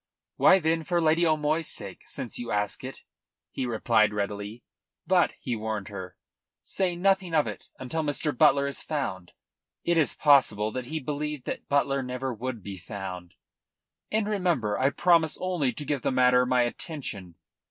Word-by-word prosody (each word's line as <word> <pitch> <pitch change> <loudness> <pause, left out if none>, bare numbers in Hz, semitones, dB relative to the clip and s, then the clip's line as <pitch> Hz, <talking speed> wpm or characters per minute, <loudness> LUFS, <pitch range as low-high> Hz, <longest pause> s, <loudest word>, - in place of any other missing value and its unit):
"Why, 190 - +7
then, 165 -2 0
for 175 +2 0
Lady 165 +1 +3
O'Moy's 155 +1 +1
sake, 100 -3 -6
since 120 - -5
you 120 -1 -5
ask 105 +2 -1
it," 130 +1 -8 0.5
he 130 - -3
replied 110 -2 +2
readily. 105 +2 -4 0.4
"But," - - +3
he 120 - -3
warned 110 -2 -4
her, 95 -3 -8 0.5
"say 185 -2 -1
nothing 190 -1 +1
of 150 - +4
it - - -7
until 130 +5 -3
Mr. 150 -1 0
Butler 140 +3 +5
is 140 -1 -2
found." 100 - -4 0.5
It 170 -1 +2
is 145 - +2
possible 110 -7 +4
he 130 +5 -3
believed 150 0 -4
that - - -5
Butler 140 -1 +2
never 125 0 -3
would 120 -2 -5
be 95 -1 -7
found. 90 -3 -7 0.8
"And 215 -1 +1
remember, 175 - 0
I 135 - +2
promise 165 +1 +3
only 175 -8 0
to 145 - -5
give 140 -2 -1
the - - 0
matter 125 -1 +4
my 125 -1 +3
attention. 120 - -5
130 Hz, 165 wpm, -27 LUFS, 110-155 Hz, 0.8 s, Why